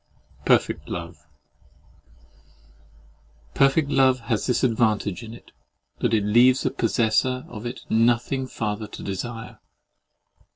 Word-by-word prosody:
PERFECT - - +1
LOVE 85 -3 -7 2.3
Perfect 140 - +3
love 130 -2 +3
has 115 -2 -2
this 125 0 0
advantage 110 -6 +1
in 110 - -9
it, - - -17 0.5
that - - 0
it 105 - +1
leaves 120 +5 +5
the - - 0
possessor 120 +3 0
of 110 +2 -7
it 120 - -7
nothing 120 +3 +1
farther 105 -3 -4
to - - -10
desire. 115 +4 -6
115 Hz, 115 wpm, -24 LUFS, 105-130 Hz, 2.3 s, leaves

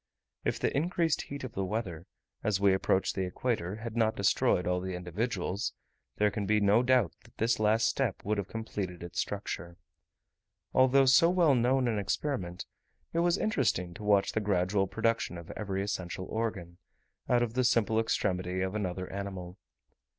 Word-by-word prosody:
If - - -1
the - - 0
increased 165 +1 +1
heat 140 -1 -7
of 130 - -6
the 95 - -2
weather, 95 -4 -4 0.4
as 105 -3 +1
we 100 -1 +4
approached 95 0 +1
the 95 - -1
equator, 95 -2 -2
had 115 +1 -7
not 110 -1 +2
destroyed 95 -2 +2
all 90 0 0
the 95 0 -4
individuals, 95 +3 -2 0.4
there 105 0 +2
can 100 -1 -3
be 105 +1 +3
no 105 +3 +4
doubt 125 - +3
that - - -21
this 115 +1 +1
last 110 +1 +3
step 125 -8 -1
would 105 0 0
have 100 - -3
completed 100 -6 -5
its 85 - -5
structure. 90 -3 -4 1.0
Although 130 +1 +5
so 135 +6 +6
well 175 -5 +4
known 125 +1 +2
an 110 -3 0
experiment, 95 - -2 0.5
it 165 - +1
was 175 +2 +3
interesting 90 - 0
to 105 - -10
watch 100 -1 +3
the - - 0
gradual 95 0 +1
production 115 -3 0
of 85 -1 -9
every 100 -2 -3
essential 95 -2 -4
organ, 100 -7 -4 0.5
out 120 -1 +4
of 115 -2 -3
the 130 +1 +1
simple 115 -2 +3
extremity 90 -4 0
of 95 +1 -1
another 95 -3 -3
animal. 95 -2 -6
105 Hz, 170 wpm, -30 LUFS, 95-120 Hz, 1.0 s, so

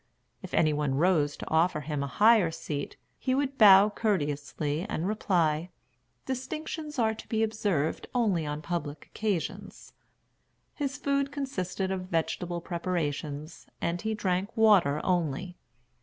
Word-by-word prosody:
If 185 - -6
any 155 -2 +3
one 145 -2 0
rose 150 -2 +2
to - - -8
offer 160 0 +2
him 150 -1 -3
a 140 - -2
higher 215 +1 +5
seat, 145 -3 -5 0.2
he 255 - 0
would 275 0 -1
bow 200 -1 +8
courteously, 150 -6 -1
and 170 - -2
reply, 175 -6 +1 0.6
"Distinctions 300 +3 -5
are 220 -2 +2
to 220 - -11
be 220 -1 +1
observed 205 -8 -1
only 205 -9 +2
on 150 0 -4
public 155 -4 -4
occasions." 205 -6 -4 0.8
His 280 -2 -3
food 280 0 0
consisted 190 -9 -3
of 185 -1 -3
vegetable 170 +1 -1
preparations, 160 -3 -4
and 170 +1 -2
he 220 0 -1
drank 190 -1 -1
water 195 -10 +5
only. 175 0 -1
180 Hz, 135 wpm, -28 LUFS, 155-220 Hz, 0.8 s, bow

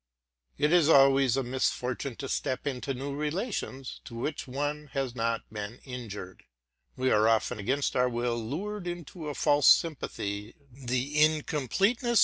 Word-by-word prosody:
It 150 +3 +2
is 170 -3 +5
always 135 -3 +6
a 135 - +1
misfortune 130 0 -1
to 135 - -6
step 130 0 -2
into 135 -1 -2
new 140 +2 -4
relations 150 - -3
to 120 - -9
which 145 +5 -3
one 145 +3 -3
has 135 -3 -1
not 115 -1 -1
been 105 +3 -6
inured: 110 -8 -7 0.5
we 130 0 +1
are 105 +1 +4
often 115 +1 +2
against 130 +8 0
our 125 0 +3
will 120 0 -1
lured 185 - -4
into 175 -2 -6
a 145 - -4
false 145 -1 +3
sympathy, 105 -9 +2 0.2
the 130 +3 +1
incompleteness? 175 - +2
135 Hz, 145 wpm, -29 LUFS, 125-150 Hz, 0.5 s, always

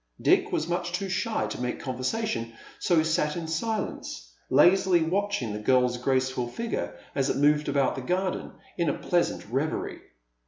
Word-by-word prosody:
Dick - - +3
was 155 - 0
much 175 0 -2
too 195 +2 -2
shy 220 +4 0
to - - -5
make 125 0 -2
conversation, 130 - -2 0.3
so 175 - +2
he 160 - +4
sat 155 -1 +1
in 165 -2 -4
silence, 160 - -3 0.2
lazily 175 +4 +5
watching 185 - -1
the 105 - -4
girl's 125 +2 +3
graceful 130 -1 0
figure 230 - -4 0.2
as 135 0 +1
it - - 0
moved 150 +1 +3
about 140 -2 +2
the 135 - -5
garden, 185 +7 -2 0.3
in 170 -3 +2
a - - -1
pleasant 175 -1 0
reverie. 140 +5 -2
155 Hz, 165 wpm, -27 LUFS, 130-180 Hz, 0.3 s, lazily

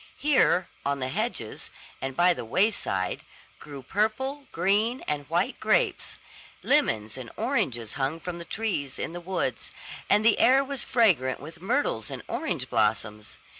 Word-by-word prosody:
Here, 260 - +3 0.2
on 140 0 0
the 130 -1 -3
hedges, 200 - -3 0.3
and 135 0 -3
by 180 +1 +5
the - - -6
wayside, 115 - 0 0.4
grew 140 -3 -9
purple, 265 - -1
green, 215 +6 +1
and 145 -2 -3
white - - 0
grapes; - - +1 0.5
lemons 110 +1 +1
and 125 -3 -7
oranges 130 - -1
hung 140 +4 -1
from 170 0 -6
trees 185 -11 -3
in - - -4
the 175 - -6
woods; 185 +1 -2 0.4
and 210 +1 +4
the 230 - +5
air 265 +2 +6
was 275 -2 -5
fragrant 155 - +3
with 160 +3 -11
myrtles 195 - 0
and - - -7
orange - - -2
blossoms. 105 0 -1
170 Hz, 145 wpm, -27 LUFS, -, 0.5 s, air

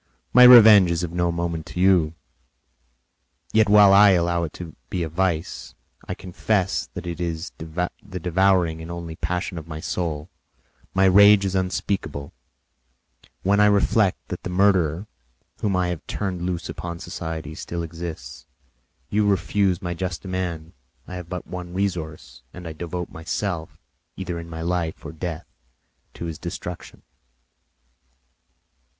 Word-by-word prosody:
My 125 - +7
revenge 110 -7 +9
is 85 0 -1
of 85 - -3
no 85 0 0
moment 85 -1 -3
to - - -7
you; 90 -4 +3 1.4
yet, 110 -2 +4
while 100 -1 +7
I 100 +1 +8
allow 85 -1 +1
it 80 - -8
to 85 -3 -9
be 90 - -2
a 80 - -3
vice, 85 0 -2 0.3
I - - -3
confess 95 +1 -1
that - - -6
it 85 0 -5
is 85 0 -3
the 90 +4 -5
devouring 90 -2 +2
and 80 - -8
only 85 -1 -6
passion 90 0 -3
of 80 - -13
my 80 -1 -6
soul. 80 -2 -3 0.7
My 95 0 +4
rage 100 +1 +7
is 95 - -1
unspeakable 90 -6 -2 1.1
when 100 +2 +3
I 105 - +6
reflect 100 -1 +3
that - - -5
the - - -5
murderer, 90 -2 +2 0.5
whom 100 -3 0
I 90 -1 +1
have 85 -3 -5
turned 95 -4 -3
loose 85 -2 -3
upon 85 -1 -6
society, 80 -3 -6
still 85 +2 -5
exists. 80 -7 -8 0.6
You 105 0 +2
refuse 100 -2 +1
my 85 -1 -2
just 90 0 -4
demand; 90 -3 -4 0.3
I - - -8
have 90 -2 -7
but 90 -1 -5
one 90 -1 -7
resource, 85 -9 -4
and 90 -1 -8
I 80 - -6
devote 90 +2 -5
myself, 80 0 -4 0.4
either 90 -3 -4
in 85 0 -9
my 80 0 -6
life 85 -2 -2
or - - -5
death, 80 +1 -5 0.7
to - - -6
his 80 -2 -6
destruction." 90 0 -7
90 Hz, 150 wpm, -23 LUFS, 80-95 Hz, 1.4 s, revenge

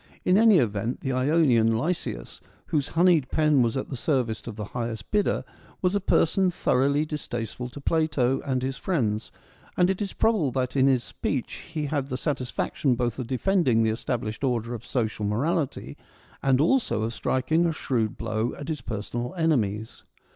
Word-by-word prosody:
In 180 - +4
any 220 -1 +6
event, 115 -2 0
the 135 - -2
Ionian 130 -5 +3
Lysias, 130 - -3 0.2
whose 145 -2 0
honeyed 170 -6 +4
pen 150 -3 +3
was 120 +1 +1
at 135 - -4
the 135 - -4
service 120 -5 -1
of 115 - -5
the 105 - -5
highest 115 -3 -4
bidder, 210 -1 +1 0.4
was 180 +1 +2
a 205 - +2
person 185 +1 +3
thoroughly 140 -2 +1
distasteful 125 -5 -5
to 135 - -10
Plato 140 -4 +1
and 130 -2 -1
his 135 0 -2
friends, 115 - -1 0.5
and 180 +1 +4
it 190 - -4
is 200 - -3
probable 215 -11 +2
that 130 -1 -1
in 135 0 +4
this 130 -3 +3
speech 90 -4 -4
he 155 -2 -2
had 140 -2 -2
the 130 - -2
satisfaction 130 -1 -1
both 120 0 -2
of 125 - -4
defending 130 - +2
the 110 - +2
established 110 0 -3
order 120 -3 0
of 115 -2 -6
social 110 -4 -2
morality, 140 - -1 0.4
and 135 -1 +3
also 165 - +2
of 115 +1 -2
striking 155 +9 +1
a - - +1
shrewd 120 -8 -1
blow 110 +1 -2
at 145 +2 -7
his 155 -2 -3
personal 120 - -4
enemies. 110 - 0
130 Hz, 175 wpm, -26 LUFS, 115-155 Hz, 0.5 s, any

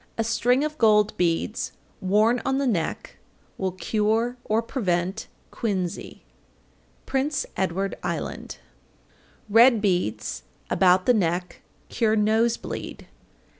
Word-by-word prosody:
A 225 - +1
string 245 +4 +2
of 305 0 -4
gold 210 -2 +4
beads 175 +6 -1 0.3
worn 215 +6 +2
on 270 0 0
the 280 - 0
neck 190 -11 -2 0.4
will 190 -2 -1
cure 220 +5 0
or 220 +2 0
prevent 190 -5 -2 0.2
quinsy. 190 -6 -3 0.8
Prince 275 +2 -1
Edward 190 +1 -1
Island. - - -4 0.9
801. - - -8
Red 235 0 +7
beads 180 - -1 0.3
about 185 0 +4
the 250 - +5
neck 180 -3 -1 0.3
cure 220 -2 +1
nose 220 +2 +2
bleed. - - -7
215 Hz, 115 wpm, -25 LUFS, 185-235 Hz, 0.9 s, Red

